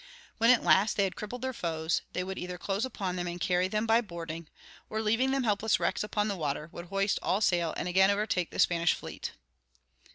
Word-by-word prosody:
When 230 Hz, +1 st, +5 dB
at 250 Hz, -2 st, +6 dB
last 200 Hz, +3 st, +4 dB
they 200 Hz, -, +4 dB
had 190 Hz, -, -1 dB
crippled 245 Hz, +4 st, -6 dB
their 260 Hz, 0 st, -2 dB
foes, 160 Hz, -5 st, -1 dB
they 180 Hz, -, -1 dB
would 190 Hz, +1 st, -5 dB
either 180 Hz, 0 st, -5 dB
close 200 Hz, +5 st, -1 dB
upon 190 Hz, -8 st, -3 dB
them 175 Hz, 0 st, -2 dB
and 175 Hz, 0 st, -5 dB
carry 180 Hz, +1 st, +2 dB
them 215 Hz, +3 st, -1 dB
by 225 Hz, +1 st, +4 dB
boarding, 170 Hz, -5 st, -7 dB, 0.4 s
or, 220 Hz, -, -2 dB
leaving 225 Hz, +4 st, +2 dB
them 270 Hz, 0 st, +1 dB
helpless 215 Hz, -1 st, +2 dB
wrecks -, -, 0 dB
upon 210 Hz, 0 st, -1 dB
the 200 Hz, -, -1 dB
water, 150 Hz, -1 st, -3 dB
would 170 Hz, -, -8 dB
hoist 195 Hz, +2 st, 0 dB
all 190 Hz, -, +1 dB
sail 175 Hz, -5 st, +2 dB
and 180 Hz, -, -2 dB
again 190 Hz, +2 st, +4 dB
overtake 200 Hz, -4 st, 0 dB
the -, -, -9 dB
Spanish 170 Hz, 0 st, +3 dB
fleet. -, -, -7 dB
190 Hz, 220 wpm, -30 LUFS, 175-215 Hz, 0.4 s, at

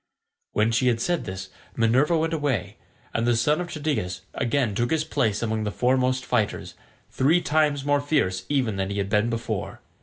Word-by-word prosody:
When 110 Hz, +2 st, +2 dB
she 120 Hz, +3 st, +2 dB
had 120 Hz, -2 st, +2 dB
said 175 Hz, +7 st, -1 dB
this 95 Hz, 0 st, -6 dB, 0.3 s
Minerva 130 Hz, +8 st, +3 dB
went 165 Hz, +1 st, 0 dB
away, 145 Hz, -, -1 dB, 0.4 s
and 115 Hz, +1 st, 0 dB
the 120 Hz, -, +3 dB
son 150 Hz, +8 st, +2 dB
of 175 Hz, -, -5 dB
Tydeus 120 Hz, -, -2 dB
again 120 Hz, -2 st, 0 dB
took 120 Hz, +4 st, 0 dB
his 160 Hz, -1 st, +1 dB
place 110 Hz, -7 st, 0 dB
among 110 Hz, -1 st, -1 dB
the 105 Hz, -, -1 dB
foremost 130 Hz, +3 st, +1 dB
fighters, 110 Hz, -4 st, -1 dB, 0.4 s
three 155 Hz, +7 st, +3 dB
times 150 Hz, -4 st, +1 dB
more 145 Hz, 0 st, +2 dB
fierce 95 Hz, -11 st, 0 dB
even 125 Hz, -8 st, 0 dB
than 95 Hz, 0 st, -1 dB
he 100 Hz, -, -3 dB
had 100 Hz, -1 st, -1 dB
been 105 Hz, +2 st, +2 dB
before. 115 Hz, -3 st, -3 dB
120 Hz, 185 wpm, -25 LUFS, 110-145 Hz, 0.4 s, Minerva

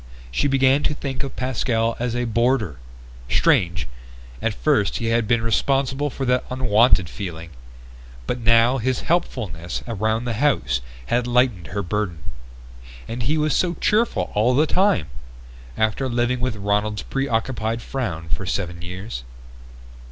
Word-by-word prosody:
She 145 Hz, -, +1 dB
began 135 Hz, 0 st, +4 dB
to 150 Hz, -, 0 dB
think 135 Hz, -2 st, -4 dB
of 135 Hz, -3 st, -5 dB
Pascal 115 Hz, -2 st, 0 dB
as 120 Hz, 0 st, -1 dB
a 120 Hz, 0 st, 0 dB
boarder. 115 Hz, -, +1 dB, 0.5 s
Strange 85 Hz, -2 st, +2 dB, 0.5 s
at -, -, -1 dB
first 100 Hz, +11 st, +1 dB
he 115 Hz, -, -1 dB
had 115 Hz, -1 st, +1 dB
been 115 Hz, -2 st, +2 dB
responsible 135 Hz, +6 st, +1 dB
for 135 Hz, 0 st, -4 dB
that 125 Hz, 0 st, +2 dB
unwanted 120 Hz, -6 st, +3 dB
feeling. 80 Hz, +4 st, -7 dB, 0.7 s
But 125 Hz, -, -2 dB
now 115 Hz, +3 st, +4 dB
his 125 Hz, +2 st, 0 dB
helpfulness 95 Hz, -, -2 dB
around 110 Hz, +1 st, -1 dB
the 120 Hz, -, -1 dB
house 110 Hz, -, +1 dB, 0.2 s
had 120 Hz, -, 0 dB
lightened 120 Hz, -, +2 dB
her 100 Hz, +6 st, -3 dB
burden. 100 Hz, -2 st, -2 dB, 0.9 s
And 120 Hz, +2 st, -4 dB
he 150 Hz, +7 st, +1 dB
was 155 Hz, -1 st, +1 dB
so 175 Hz, -1 st, +1 dB
cheerful 210 Hz, -, +1 dB
all 115 Hz, +5 st, +3 dB
the 150 Hz, +4 st, +4 dB
time! 185 Hz, -, +2 dB, 0.7 s
After 110 Hz, +5 st, +1 dB
living 120 Hz, +1 st, 0 dB
with 125 Hz, -2 st, -1 dB
Ronald's 105 Hz, +1 st, -1 dB
preoccupied 115 Hz, -3 st, -1 dB
frown 95 Hz, -, -4 dB
for 95 Hz, -, -2 dB
seven 85 Hz, -3 st, -3 dB
years 90 Hz, -, -6 dB
115 Hz, 145 wpm, -22 LUFS, 100-130 Hz, 0.9 s, began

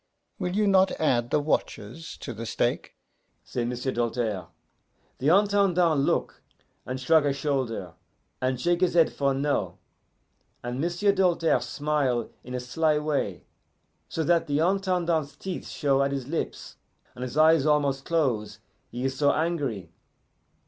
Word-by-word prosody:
'Will 180 Hz, +1 st, -2 dB
you 210 Hz, 0 st, +2 dB
not 190 Hz, -1 st, +5 dB
add 120 Hz, -6 st, +1 dB
the 150 Hz, -, +2 dB
watches 145 Hz, -1 st, -3 dB
to 120 Hz, -, -7 dB
the 115 Hz, +1 st, -6 dB
stake?' -, -, -1 dB, 0.5 s
say 120 Hz, -, -3 dB
M'sieu' 125 Hz, +2 st, -2 dB
Doltaire. 115 Hz, -6 st, -2 dB, 0.7 s
The 135 Hz, -, -1 dB
Intendant 185 Hz, -4 st, +3 dB
look, 140 Hz, -, 0 dB, 0.5 s
and 130 Hz, +1 st, -3 dB
shrug 155 Hz, +4 st, +4 dB
a 145 Hz, -, +2 dB
shoulder, 130 Hz, -, -2 dB, 0.5 s
and 130 Hz, -1 st, 0 dB
shake 175 Hz, +5 st, +1 dB
his 180 Hz, -2 st, +2 dB
head 165 Hz, -2 st, +4 dB
for 140 Hz, -1 st, +1 dB
no, 135 Hz, -11 st, -1 dB, 0.9 s
and 120 Hz, +2 st, -3 dB
M'sieu' 175 Hz, +5 st, +1 dB
Doltaire 175 Hz, -4 st, +2 dB
smile 145 Hz, -7 st, -1 dB
in 125 Hz, +1 st, -6 dB
a -, -, -1 dB
sly 150 Hz, +5 st, +1 dB
way, 150 Hz, -, -2 dB, 0.7 s
so 160 Hz, -, -2 dB
that 170 Hz, +1 st, +2 dB
the 145 Hz, -1 st, 0 dB
Intendant's 175 Hz, -4 st, 0 dB
teeth 185 Hz, +1 st, -6 dB
show 140 Hz, -2 st, +1 dB
at 140 Hz, 0 st, +1 dB
his 135 Hz, -2 st, -3 dB
lips 165 Hz, +3 st, -4 dB, 0.4 s
and -, -, -11 dB
his 125 Hz, +3 st, -4 dB
eyes 155 Hz, -1 st, +5 dB
almost 140 Hz, -3 st, +2 dB
close, 130 Hz, -11 st, 0 dB, 0.3 s
he 125 Hz, -, -5 dB
is 135 Hz, 0 st, -1 dB
so 145 Hz, +1 st, +3 dB
angry. 145 Hz, -, -2 dB
145 Hz, 150 wpm, -26 LUFS, 125-165 Hz, 0.9 s, not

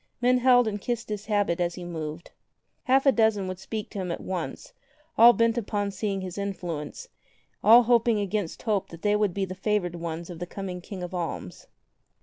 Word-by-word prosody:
Men 250 Hz, +1 st, +3 dB
held 245 Hz, -1 st, +5 dB
and 205 Hz, -1 st, -3 dB
kissed 235 Hz, 0 st, -3 dB
his 210 Hz, -1 st, -5 dB
habit 205 Hz, -5 st, +1 dB
as 175 Hz, -1 st, 0 dB
he 180 Hz, -, -7 dB
moved. 160 Hz, -1 st, -6 dB, 0.5 s
Half 265 Hz, +2 st, +3 dB
a 275 Hz, -, +7 dB
dozen 220 Hz, -4 st, +2 dB
would 185 Hz, 0 st, -5 dB
speak 215 Hz, +2 st, -5 dB
to 200 Hz, -, -5 dB
him 180 Hz, -2 st, -3 dB
at -, -, -3 dB
once, 180 Hz, -3 st, -5 dB, 0.4 s
all 235 Hz, +1 st, +9 dB
bent 230 Hz, 0 st, +2 dB
upon 205 Hz, -2 st, -2 dB
seeking 195 Hz, -1 st, -2 dB
his 185 Hz, +1 st, -6 dB
influence, 185 Hz, -, -5 dB, 0.6 s
all 235 Hz, +3 st, +8 dB
hoping 235 Hz, -1 st, +3 dB
against 200 Hz, -3 st, -3 dB
hope 210 Hz, -5 st, 0 dB
that 165 Hz, 0 st, -12 dB
they 210 Hz, 0 st, +3 dB
would 210 Hz, -4 st, +1 dB
be 195 Hz, -1 st, 0 dB
the 185 Hz, -, -6 dB
favored 195 Hz, -2 st, -1 dB
ones 170 Hz, 0 st, -5 dB
of 170 Hz, -, -9 dB
the 175 Hz, -, -5 dB
coming 185 Hz, -1 st, -6 dB
King 185 Hz, 0 st, -7 dB
of 180 Hz, -, -6 dB
Alms. 165 Hz, -, -5 dB
200 Hz, 200 wpm, -26 LUFS, 175-220 Hz, 0.6 s, all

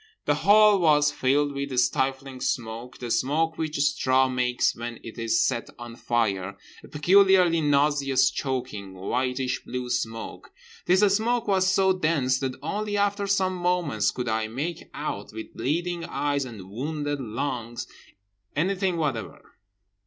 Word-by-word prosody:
The -, -, +3 dB
hall 210 Hz, 0 st, +5 dB
was 150 Hz, -3 st, +4 dB
filled 145 Hz, +2 st, +1 dB
with 140 Hz, -2 st, -4 dB
stifling 135 Hz, 0 st, -1 dB
smoke; 120 Hz, 0 st, -3 dB
the 120 Hz, -2 st, -5 dB
smoke 160 Hz, +6 st, 0 dB
which 155 Hz, -1 st, -2 dB
straw 130 Hz, -2 st, +2 dB
makes 125 Hz, -1 st, 0 dB
when 120 Hz, 0 st, -6 dB
it 115 Hz, 0 st, -9 dB
is 115 Hz, 0 st, +1 dB
set 115 Hz, -, -2 dB
on 120 Hz, -1 st, -9 dB
fire, 100 Hz, -6 st, -1 dB, 0.3 s
a -, -, -12 dB
peculiarly 180 Hz, +1 st, +4 dB
nauseous 140 Hz, -2 st, +2 dB
choking, 125 Hz, -8 st, -4 dB
whitish 125 Hz, +6 st, -2 dB
blue 125 Hz, -1 st, -5 dB
smoke. 115 Hz, 0 st, -4 dB, 0.4 s
This 185 Hz, +2 st, +4 dB
smoke 235 Hz, +2 st, 0 dB
was 190 Hz, -2 st, +3 dB
so 190 Hz, 0 st, +3 dB
dense 155 Hz, -8 st, +1 dB
that 130 Hz, -2 st, -3 dB
only 210 Hz, 0 st, -2 dB
after 200 Hz, 0 st, 0 dB
some 190 Hz, -1 st, +1 dB
moments 175 Hz, -, 0 dB
could 125 Hz, -1 st, -4 dB
I 110 Hz, 0 st, 0 dB
make 150 Hz, +9 st, -5 dB
out, 105 Hz, -10 st, -5 dB
with 110 Hz, 0 st, -8 dB
bleeding 170 Hz, +4 st, -2 dB
eyes 145 Hz, -2 st, -1 dB
and 100 Hz, -6 st, -10 dB
wounded 145 Hz, +4 st, -3 dB
lungs, 120 Hz, 0 st, -4 dB, 0.7 s
anything 185 Hz, +3 st, 0 dB
whatever. 135 Hz, -9 st, -4 dB
140 Hz, 140 wpm, -25 LUFS, 120-170 Hz, 0.7 s, hall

